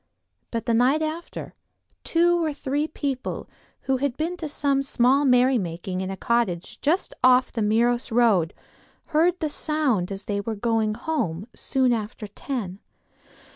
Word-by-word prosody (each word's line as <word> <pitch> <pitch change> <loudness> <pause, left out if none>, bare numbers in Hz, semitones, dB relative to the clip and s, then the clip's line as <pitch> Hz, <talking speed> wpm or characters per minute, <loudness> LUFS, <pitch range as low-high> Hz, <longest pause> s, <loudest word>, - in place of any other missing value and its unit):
But 230 -1 -3
the 235 - +1
night 260 +7 +3
after, 315 +2 -5 0.5
two 345 +1 +3
or 310 -2 -1
three 290 +1 -1
people, 275 -4 -4 0.3
who 265 -1 0
had 270 -1 -1
been 330 +3 -1
to 320 -3 -5
some 280 -1 +1
small 270 +1 +3
merrymaking 200 -9 +2
in 190 - -3
a 195 - -5
cottage 235 -2 -1
just 335 +7 +1
off 255 0 +5
the 230 - -3
Meiros 235 +4 +2
road, 220 -9 +3 0.6
heard 340 +4 +3
the 315 - +1
sound 280 - 0
as 195 +1 -5
they 200 -1 -2
were 220 +2 -3
going 220 0 0
home, 225 - -2
soon 260 -2 +1
after 220 0 -4
ten. 205 -3 -5
245 Hz, 150 wpm, -24 LUFS, 215-290 Hz, 0.6 s, off